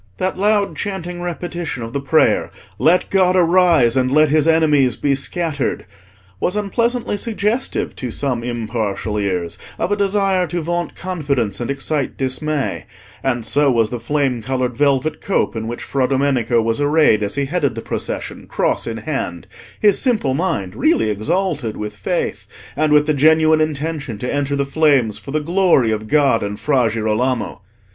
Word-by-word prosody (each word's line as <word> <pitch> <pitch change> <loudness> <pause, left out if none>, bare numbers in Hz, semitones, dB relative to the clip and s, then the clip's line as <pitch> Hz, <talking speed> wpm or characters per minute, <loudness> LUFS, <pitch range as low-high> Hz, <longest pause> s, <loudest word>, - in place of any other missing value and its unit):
That 185 - -1
loud 205 +1 +1
chanting 180 -3 -4
repetition 175 -6 -4
of 115 +1 -7
the 140 - -2
prayer, 150 +3 +2 0.3
"Let 175 +3 +3
God 185 -1 +3
arise, 170 -8 +4
and 130 -1 +1
let 155 +1 +4
His 155 +1 +2
enemies 150 -6 +3
be 140 - 0
scattered," 145 +1 -2 0.5
was 180 - -1
unpleasantly 230 +2 0
suggestive 220 +3 -2
to 125 - -4
some 125 -1 -2
impartial 110 -3 -3
ears 90 -4 -2 0.2
of 185 - -2
a - - +3
desire 195 -2 +1
to 175 +1 -3
vaunt 175 0 -2
confidence 140 - -2
and 120 - -4
excite 140 0 -2
dismay; 135 +2 -2 0.4
and 120 -4 -1
so 140 +5 +3
was 115 -4 +2
the 120 - -3
flame 130 0 -1
coloured 125 +1 -2
velvet 140 +2 +1
cope 195 - 0
in 110 0 -4
which 120 +1 -5
Fra 135 -2 0
Domenico 130 -4 +1
was 115 +4 -1
arrayed 145 -7 +3
as 100 -1 -2
he 140 0 0
headed 140 -5 -1
the 115 - -5
procession, - - -5
cross - - -1
in 115 -1 -3
hand, 115 - -4 0.3
his 205 -2 +4
simple 220 - +1
mind 115 - -1
really 110 -3 +2
exalted 130 - -1
with 105 0 -5
faith, 95 - -3 0.3
and 155 +1 +1
with 150 0 +5
the 155 - +1
genuine 155 +2 +4
intention 150 -5 -2
to 125 +4 -3
enter 145 0 -1
the 140 0 0
flames 140 -7 +2
for - - -12
the 155 +3 0
glory 165 -7 +2
of 110 0 -3
God 140 -4 +3
and 105 +1 -4
Fra 130 -6 +2
Girolamo. 115 +2 -1
140 Hz, 165 wpm, -19 LUFS, 120-170 Hz, 0.5 s, with